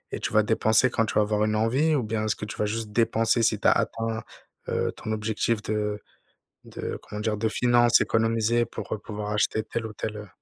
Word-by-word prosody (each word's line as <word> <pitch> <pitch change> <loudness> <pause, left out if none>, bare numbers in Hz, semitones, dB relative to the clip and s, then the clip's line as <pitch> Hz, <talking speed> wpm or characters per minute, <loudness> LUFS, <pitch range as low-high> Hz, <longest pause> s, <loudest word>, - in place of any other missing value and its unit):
et - - -5
tu - - -3
vas 110 0 +4
dépenser 110 +3 +3
quand 115 - +1
tu - - -4
vas 105 - +5
avoir 105 0 +1
une 110 0 +1
envie? 130 +9 +2
Ou 130 - 0
bien, 110 0 -2
est-ce 110 - 0
que 105 - -6
tu - - -7
vas 105 - 0
juste 110 0 -3
dépenser 115 +1 +2
si 110 -2 +2
tu - - +1
as - - +7
atteint, 115 -1 -1 0.5
heu, - - 0
ton 110 - -6
objectif 110 +1 -1
de 105 -1 -2 0.6
de - - -6
comment 105 - -8
dire? 105 -1 -1
De 110 +1 0
finance? 120 +1 +4
Economiser 115 +1 +1
pour - - -7 0.2
pouvoir 105 -1 -5
acheter 105 +1 +1
telle 115 +1 -4
ou 105 - -10
telle 105 +1 -5
heu 105 - -8
110 Hz, 225 wpm, -26 LUFS, 105-115 Hz, 0.6 s, as